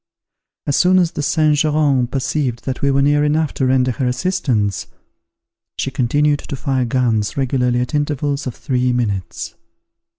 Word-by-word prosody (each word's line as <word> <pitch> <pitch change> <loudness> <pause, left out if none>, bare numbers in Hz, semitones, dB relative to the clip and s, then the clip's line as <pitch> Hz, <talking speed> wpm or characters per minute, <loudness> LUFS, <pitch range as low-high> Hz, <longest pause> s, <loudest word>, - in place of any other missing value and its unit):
As 140 - 0
soon 185 +1 +4
as 175 -3 +2
the - - -4
Saint 155 0 +2
Geran 145 -4 +2
perceived 125 -1 -2
that 130 -1 -3
we 140 - +2
were 140 0 +2
near 145 +1 +3
enough 150 0 +1
to 130 - 0
render 130 0 +2
her 125 +2 -2
assistance, 125 - -1 0.9
she 135 - -2
continued 145 +3 +1
to - - -6
fire 130 -2 -1
guns 115 -3 0
regularly 125 -2 +1
at 125 - -4
intervals 145 -1 -1
of 125 - -5
three 125 -1 0
minutes. 100 -8 -3
135 Hz, 160 wpm, -18 LUFS, 125-150 Hz, 0.9 s, soon